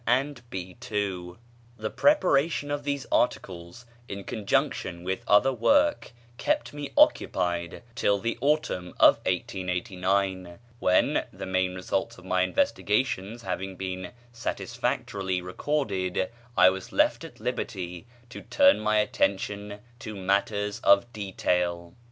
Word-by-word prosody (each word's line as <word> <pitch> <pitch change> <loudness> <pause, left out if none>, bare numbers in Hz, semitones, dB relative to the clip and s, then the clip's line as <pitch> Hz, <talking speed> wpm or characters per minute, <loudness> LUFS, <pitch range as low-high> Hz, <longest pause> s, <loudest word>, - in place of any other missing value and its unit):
and 130 +2 +1
"B. 90 -2 -6 0.2
ii." 95 -4 -2 0.4
The 110 0 -4
preparation 165 - +2
of 145 0 -2
these 140 -1 -2
articles, 90 0 -1 0.2
in 100 0 -6
conjunction 95 -4 -1
with 95 +1 -2
other 130 +6 +5
work, 285 - +2 0.3
kept 300 - 0
me 145 -1 -5
occupied 85 +1 +2
till 100 -5 +2
the 115 +3 -2
autumn 140 - 0
of - - +7
1889, 95 -2 -1 0.2
when, 90 -4 +3
the 95 +1 -7
main 95 0 0
results 90 +1 -2
of 90 - -14
my 95 0 +1
investigations 105 +4 0
having 95 0 -4
been 95 -1 -5 0.2
satisfactorily 100 -4 -2
recorded, 95 -2 -1 0.3
I 95 0 +8
was 95 0 -7
left - - +2
at - - -11
liberty 90 +2 -4 0.2
to - - -8
turn 280 -1 +4
my 110 0 +2
attention 105 0 -1 0.2
to 110 -3 -7
matters 100 +2 0
of 100 +5 +4
detail. 90 -4 -1
100 Hz, 120 wpm, -27 LUFS, 90-120 Hz, 0.4 s, I